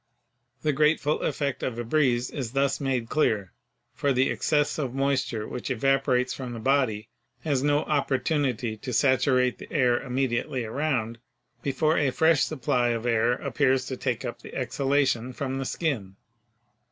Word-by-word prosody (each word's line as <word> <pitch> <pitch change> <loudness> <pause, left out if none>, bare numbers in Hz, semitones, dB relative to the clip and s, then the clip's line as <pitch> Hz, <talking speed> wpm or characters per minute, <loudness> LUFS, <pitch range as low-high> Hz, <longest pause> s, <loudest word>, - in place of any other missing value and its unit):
The 150 - +2
grateful 150 +1 +2
effect 140 -3 -2
of 120 -3 -3
a 120 - -2
breeze 125 -1 +1
is 130 -5 -5
thus 140 0 +1
made 130 -4 -1
clear, 110 -10 0 0.4
for 140 - 0
the 130 0 +2
excess 150 0 +1
of 130 -4 -3
moisture 135 -5 0
which 125 - -5
evaporates 130 0 +1
from 125 -3 -6
the 115 - -6
body 125 -4 +1 0.3
has 140 -5 0
no 145 +1 +2
56 - - -8
PHYSICS 150 - +3
opportunity 135 -5 -1
to 125 +3 -6
saturate 130 0 +3
the - - -11
air 125 -5 +2
immediately 125 -1 -1
around, 120 -2 -2 0.4
before 155 +4 +1
a 145 - +2
fresh 160 +3 +3
supply 125 -4 0
of 115 -1 -1
air 115 0 +2
appears 130 0 +1
to 130 - -4
take - - -2
up - - -6
the - - -11
exhalation 135 -3 0
from 135 0 -3
the 135 - -3
skin. 125 - -2
130 Hz, 165 wpm, -26 LUFS, 120-140 Hz, 0.4 s, PHYSICS